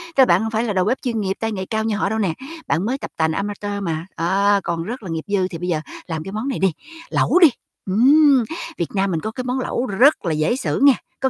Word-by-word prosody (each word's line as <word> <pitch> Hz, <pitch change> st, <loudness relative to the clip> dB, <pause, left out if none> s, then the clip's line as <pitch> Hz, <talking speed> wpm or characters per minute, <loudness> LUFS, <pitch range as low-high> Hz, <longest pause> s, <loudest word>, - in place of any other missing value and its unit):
tức 270 Hz, -, +6 dB
là -, -, +8 dB
bạn 180 Hz, -2 st, +3 dB
hông 225 Hz, -, -2 dB
phải 225 Hz, +1 st, 0 dB
là 220 Hz, -4 st, -1 dB
đầu 185 Hz, -1 st, +1 dB
bếp 250 Hz, +5 st, 0 dB
chuyên 230 Hz, -4 st, -2 dB
nghiệp, 190 Hz, -1 st, -1 dB
tay 225 Hz, 0 st, -2 dB
nghề 190 Hz, -3 st, -4 dB
cao 220 Hz, +2 st, -2 dB
như 220 Hz, -1 st, 0 dB
họ 200 Hz, -, 0 dB
đâu 220 Hz, +1 st, -1 dB
nè, 190 Hz, -6 st, 0 dB, 0.3 s
bạn 170 Hz, +4 st, 0 dB
mới 255 Hz, +4 st, -1 dB
tập -, -, -8 dB
tành 160 Hz, 0 st, +2 dB
amateur 205 Hz, +3 st, -3 dB
mà, 165 Hz, -2 st, -3 dB
đó, 200 Hz, +4 st, +2 dB
còn 170 Hz, -1 st, -2 dB
rất 235 Hz, +6 st, -6 dB
là 190 Hz, -, -7 dB
nghiệp 160 Hz, -1 st, -4 dB
dư. 185 Hz, -1 st, +1 dB
Thì 175 Hz, -, -7 dB
bây 175 Hz, +2 st, -5 dB
giờ 160 Hz, -3 st, 0 dB, 0.3 s
làm 160 Hz, -3 st, -4 dB
cái 195 Hz, -, -7 dB
món 215 Hz, +6 st, -4 dB
này 270 Hz, -, -2 dB
đi, 190 Hz, -1 st, +3 dB, 0.4 s
lẩu -, -, +3 dB
đi. 335 Hz, -4 st, +8 dB, 0.4 s
Ừm, 270 Hz, +5 st, +5 dB, 0.3 s
Việt 170 Hz, -, -2 dB
Nam 195 Hz, 0 st, +1 dB
mình 165 Hz, -, 0 dB
có 220 Hz, -, -4 dB
cái 255 Hz, +3 st, -5 dB
món 250 Hz, +1 st, -2 dB
lẩu 250 Hz, 0 st, -2 dB
rất 245 Hz, +4 st, +3 dB
là 170 Hz, -, 0 dB
dễ 155 Hz, +10 st, +1 dB
xử 265 Hz, -, -2 dB
nghe, 280 Hz, -1 st, +8 dB, 0.3 s
có 265 Hz, -, +1 dB
205 Hz, 280 wpm, -21 LUFS, 180-245 Hz, 0.4 s, là